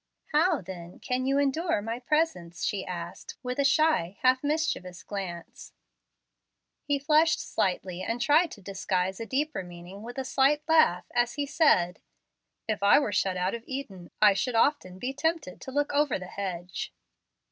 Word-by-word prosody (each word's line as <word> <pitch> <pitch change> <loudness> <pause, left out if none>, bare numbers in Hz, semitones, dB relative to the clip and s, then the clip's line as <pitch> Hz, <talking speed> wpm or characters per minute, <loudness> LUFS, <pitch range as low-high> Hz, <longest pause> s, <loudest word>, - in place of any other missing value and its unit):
"How, 320 -1 +3
then, 175 -1 -9
can 255 +1 -2
you 275 +1 +2
endure 285 - +1
my 225 +3 -4
presence?" 245 - -1
she 195 -2 -1
asked, 175 0 -7
with 250 +2 -3
a - - +4
shy, 275 - +2
half 255 +1 +4
mischievous 290 - -1
glance. 185 -4 -7 1.1
He 285 -1 0
flushed 305 +3 +3
slightly, 185 -1 -2
and 230 +5 -2
tried 305 +7 +4
to 200 - -13
disguise 190 -1 -2
a 225 - -5
deeper 295 -2 -1
meaning 175 +2 -10
with 240 +3 -8
a 265 - -2
slight 280 +4 +3
laugh, 315 - +4
as 240 0 +1
he 290 - -1
said, 275 - +3 0.7
"If 215 -2 -1
I 200 - +6
were 280 -7 +1
shut 185 -1 +1
out 180 +2 0
of 235 -1 -5
Eden, 210 -10 -6
I 210 -1 +7
should 240 +5 -1
often 225 -7 +2
be 250 +7 -3
tempted 320 - -2
to 265 - -7
look 290 +1 0
over 290 -3 +2
the 185 - -8
hedge." 180 -2 -5
235 Hz, 170 wpm, -28 LUFS, 185-290 Hz, 1.1 s, I